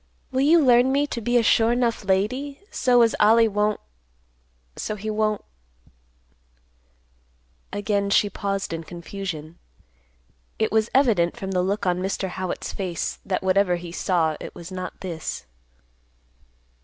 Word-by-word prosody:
Will 260 0 +1
you 315 +5 +6
learn 255 -2 +5
me 280 +2 +2
to 240 -5 -5
be 240 +2 +2
a 235 - +3
sure 230 +1 +4
'nough 235 -3 0
lady, 235 +9 -1
so 245 -2 +4
as 230 - +2
Ollie 225 +2 +6
won't—so - - -5
he 215 +1 -4
won't—" 215 -1 0 2.3
Again 205 0 -1
she 205 - +4
paused 195 -2 -3
in 165 0 -4
confusion. 170 -2 -7 1.0
It 220 - 0
was 220 0 +2
evident, 215 -11 +3
from 190 0 -5
the 180 -1 +1
look 195 +3 -1
on 180 0 +1
Mr. 190 0 -2
Howitt's 185 0 -4
face, 180 -4 -3
that, 190 -1 -2
whatever 190 -1 +3
he 175 -1 -7
saw, 170 -3 0
it - - -9
was 175 +1 -9
not 185 -1 -6
this. 170 -5 -5
200 Hz, 140 wpm, -24 LUFS, 175-225 Hz, 2.3 s, you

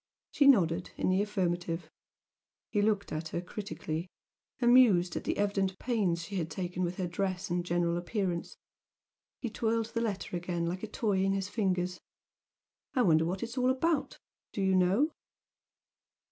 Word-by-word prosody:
She 285 - +4
nodded 175 -9 +4
in - - +1
the 190 +2 +3
affirmative. 175 -5 -1 0.8
He 205 - +2
looked 205 -1 +1
at 155 +1 -3
her 165 - -3
critically, 180 -3 -5 0.5
amused 240 -9 +5
at - - -4
the - - -1
evident 195 -2 0
pains 195 -9 0
she 195 +3 -5
had 165 -2 -2
taken 180 -1 -4
with 175 0 -1
her 185 - -1
dress 185 +1 -2
and 175 0 0
general 175 -1 0
appearance. 175 -1 -2 0.8
He 235 - -3
twirled 225 0 -1
the 230 - 0
letter 205 -5 -3
again 175 -1 -2
like 180 +2 -3
a 220 - -4
toy 205 -3 0
in 195 0 +2
his 195 0 -2
fingers. 185 -4 -1 1.0
"I 255 - +4
wonder 160 -4 +4
what 185 +5 -2
it's 235 +3 -4
all 250 0 +3
about? 295 +3 0 0.4
Do 200 - -2
you 190 0 +3
know?" 190 - +3
190 Hz, 160 wpm, -31 LUFS, 175-215 Hz, 1.0 s, amused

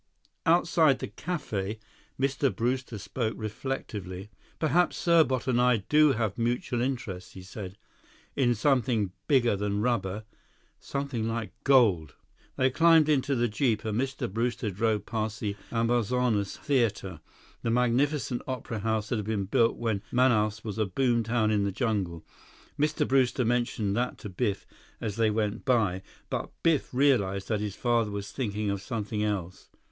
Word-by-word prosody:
Outside 165 -4 +4
the - - -5
café, 110 - -4 0.4
Mr. 135 0 +1
Brewster 125 0 -1
spoke 110 +3 -3
reflectively. 105 -4 -5 0.3
"Perhaps 170 +3 +2
Serbot 160 -7 +3
and 125 -2 +2
I 125 -4 +3
do 150 -1 +5
have 110 -4 -2
mutual 120 +1 0
interests," 115 -8 -4
he 95 - -10
said. 95 0 -8 0.6
"In 120 -3 +2
something 120 -5 +1 0.2
bigger 120 -6 +3
than 100 +1 -1
rubber. 110 -4 -1 0.6
Something 140 -5 -3
like 115 -1 -3
gold." 105 - +4 0.4
They 130 0 +2
climbed 165 +1 +5
into 140 -1 +2
the 120 -1 +2
jeep, 115 -1 0
and 110 +2 0
Mr. 135 0 -2
Brewster 115 +1 -2
drove 105 +1 0
past 110 -2 -3
the 100 -2 -2 0.2
Amazonas 115 -2 +1
Theater, 115 - -1 0.4
the - - -1
magnificent 125 +2 +1
opera 125 -3 -4
house 110 0 -1
that 120 - 0
had 105 - -3
been 105 -2 -1
built 115 +4 +2
when 110 -4 -1
Manaus 110 -4 +2
was 110 0 -5
a 110 - +2
boom 120 +4 +1
town 110 -1 +1
in 105 -2 +2
the 100 - 0
jungle. 95 -7 -2 0.5
Mr. 150 +1 +1
Brewster 130 -1 +2
mentioned 115 -4 0
that 125 +2 -1
to 105 - -8
Biff 100 +1 -2 0.3
as 105 -2 -4
they 115 -1 +3
went 105 -1 -1
by; 110 -8 +2 0.3
but - - -2
Biff 160 -4 +2
realized 110 -8 +2
that 110 -2 +1
his 105 -2 -3
father 120 -3 +1
was 100 -1 -5
thinking 105 -5 -2
of 100 -1 -3
something 105 0 -3
else. 95 -4 -3
115 Hz, 150 wpm, -28 LUFS, 105-130 Hz, 0.6 s, do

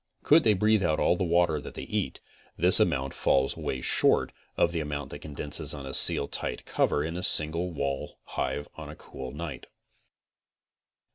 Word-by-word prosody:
Could 155 +2 +5
they 110 -2 +3
breathe 105 +2 +2
out 80 -4 0
all - - +2
the 90 - -2
water 85 -3 +1
that - - -10
they - - -6
eat, - - -4 0.4
this 90 +3 +6
amount 70 -5 0
falls 65 0 0
away 65 - -4
short - - +3 0.3
of 85 - +2
the 85 - -3
amount 75 -2 -5
that 75 - -8
condenses 75 0 -2
on 70 -2 -8
a 65 - -7
Seal 70 - +5
Tight - - -3
cover 75 - 0
in 80 +2 -5
a 90 - -4
single 85 +1 +3
wall 70 -3 -4
hive 75 - -4
on - - -10
a - - -9
cool 65 -1 -9
night. 75 -1 -8
75 Hz, 185 wpm, -27 LUFS, 70-85 Hz, 0.4 s, this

